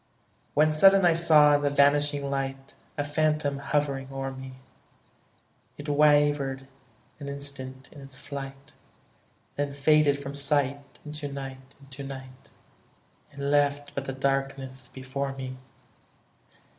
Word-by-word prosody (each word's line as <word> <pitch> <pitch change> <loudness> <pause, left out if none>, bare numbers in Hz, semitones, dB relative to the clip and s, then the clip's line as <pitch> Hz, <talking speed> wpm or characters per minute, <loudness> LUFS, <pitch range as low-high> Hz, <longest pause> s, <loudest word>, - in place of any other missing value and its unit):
When 155 +1 +4
sudden 195 +4 +6
I 170 - +6
saw 155 -3 +6
in 145 - +3
the 145 - +2
vanishing 145 0 +3
light 135 -1 -4 0.2
A 145 - -1
phantom 150 -1 0
hovering 140 -1 -1
o'er 135 0 -4
me; 130 0 -9 1.2
It 145 - -8
wavered 145 -2 +3 0.5
an 140 -1 -6
instant 135 -2 -7
in 145 - -12
its 135 -1 -9
flight; 135 -1 -8 0.8
Then 140 -1 -2
faded 145 0 +4
from 140 0 -7
sight, 140 -1 -1
into 150 -1 -5
night, 135 -1 -8
into 135 0 -11
night, 130 -1 -10 0.8
And 140 0 -3
left 145 0 +1
but 140 - -4
the 135 - -4
darkness 135 -1 -2
before 135 +1 -4
me. 130 -1 -6
140 Hz, 125 wpm, -27 LUFS, 135-145 Hz, 1.2 s, sudden